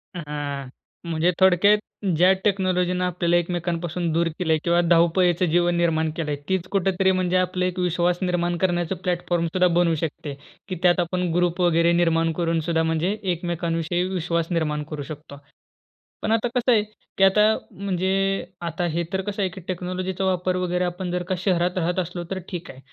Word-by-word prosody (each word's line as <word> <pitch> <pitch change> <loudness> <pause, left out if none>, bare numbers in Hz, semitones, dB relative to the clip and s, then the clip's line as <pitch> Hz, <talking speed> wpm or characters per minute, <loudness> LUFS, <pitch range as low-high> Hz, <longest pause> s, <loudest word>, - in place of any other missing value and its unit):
हां. 145 -4 -5 0.4
म्हणजे 165 +2 +2
थोडक्यात 190 +2 +5 0.4
ज्या 180 +3 +6
टेक्नॉलॉजीनं 185 -2 +1
आपल्याला 175 -1 0
एकमेकांपासून 175 0 -2
दूर 170 +1 +2
केलं 170 -3 0
आहे 155 - +1
किंवा 170 0 +3
धावपळीच 170 +1 +3
जीवन 175 +1 +2
निर्माण 160 -2 +1
केलं 155 -3 -2
आहे, 145 - -2
तीच 190 -1 0
कुठेतरी 190 -1 +2
म्हणजे 185 -1 +1
आपलं 185 0 0
एक 185 0 -2
विश्वास 175 0 +1
निर्माण 175 -1 0
करण्याचं 175 0 0
प्लॅटफॉर्मसुद्धा 175 0 0
बनू 170 -2 +3
शकते, 155 -1 -4 0.3
की 185 - -4
त्यात 175 0 +4
आपण 180 0 -1
ग्रुप 175 +1 +1
वगैरे 170 -1 +3
निर्माण 165 -1 +2
करून 165 -1 +1
सुद्धा 165 0 0
म्हणजे 165 +5 0
एकमेकांविषयी 170 -1 -1
विश्वास 170 -3 -1
निर्माण 150 -3 0
करू 150 -2 -4
शकतो. 150 -1 -9 0.8
पण - - -1
आता 225 +1 +2
कसं 250 0 +2
आहे, 220 -3 +5 0.4
की 195 - +3
आता 195 +2 +5 0.3
म्हणजे 190 -2 -3 0.6
आता 170 +1 -2
हे 170 +1 0
तर 190 - 0
कसं 205 +1 -4
आहे, 190 - +1
की 185 +1 -10
टेक्नॉलॉजीचा 185 +1 -3
वापर 185 -1 0
वगैरे 180 0 0
आपण 180 0 -4
जर 180 0 -1
का 185 - +1
शहरात 180 -1 +1
राहत 180 +1 0
असलो 175 0 -4
तर 190 - -2
ठीक 175 -2 -6
आहे. 130 - -15
175 Hz, 175 wpm, -23 LUFS, 170-185 Hz, 0.8 s, ज्या